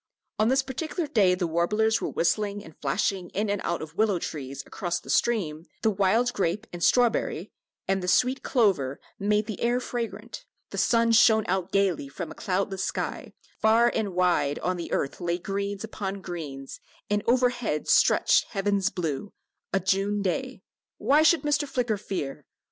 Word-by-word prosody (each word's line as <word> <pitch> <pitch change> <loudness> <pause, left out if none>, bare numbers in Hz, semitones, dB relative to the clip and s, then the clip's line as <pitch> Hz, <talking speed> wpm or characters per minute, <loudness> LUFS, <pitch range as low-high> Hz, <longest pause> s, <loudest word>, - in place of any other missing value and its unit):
On 215 - +4
this 265 +2 +3
particular 310 +6 -3
day 205 -10 +3
the 180 -1 -1
warblers 210 +7 +1
were - - -2
whistling 205 +3 0
and 160 - -13
flashing 175 +6 -1
in 205 +1 0
and 205 - -1
out 170 -2 -2
of 155 +1 -10
willow 210 -2 +2
trees 140 -5 -6
across 175 -2 -3
the - - -6
stream, 170 -9 0 0.2
the 220 - +4
wild 215 +5 +2
grape 195 +3 -1
and 175 -1 -5
strawberry 240 -2 +2 0.4
and 195 0 +1
the 180 - -4
sweet 250 +8 +2
clover 185 - +1 0.2
made 210 +1 +1
the 215 - -6
air 240 +1 +2
fragrant, 245 - -5 0.3
the - - -6
sun 230 -1 +3
shone 220 -1 +5
out 185 0 -1
gaily 190 -8 +1
from 170 +4 -6
a - - -6
cloudless 190 0 -2
sky, - - -4 0.3
far 230 +2 +4
and 205 -5 -2
wide 175 -6 +2
on 185 - 0
the 170 -1 -6
earth 140 - -2
lay 175 0 0
greens 200 +2 -3
upon 200 -3 -4
greens, 145 -7 -7 0.3
and 205 0 +1
overhead 245 -9 +1
stretched - - +4
heaven's 200 -1 0
blue 180 0 -3 0.4
a 195 - +2
June 200 +2 0
day 255 +8 -3 0.3
why 295 +3 +4
should 320 +1 +4
Mr. 295 0 +1
Flicker 240 -6 -1
fear? 150 -9 -5
200 Hz, 170 wpm, -26 LUFS, 175-230 Hz, 0.4 s, shone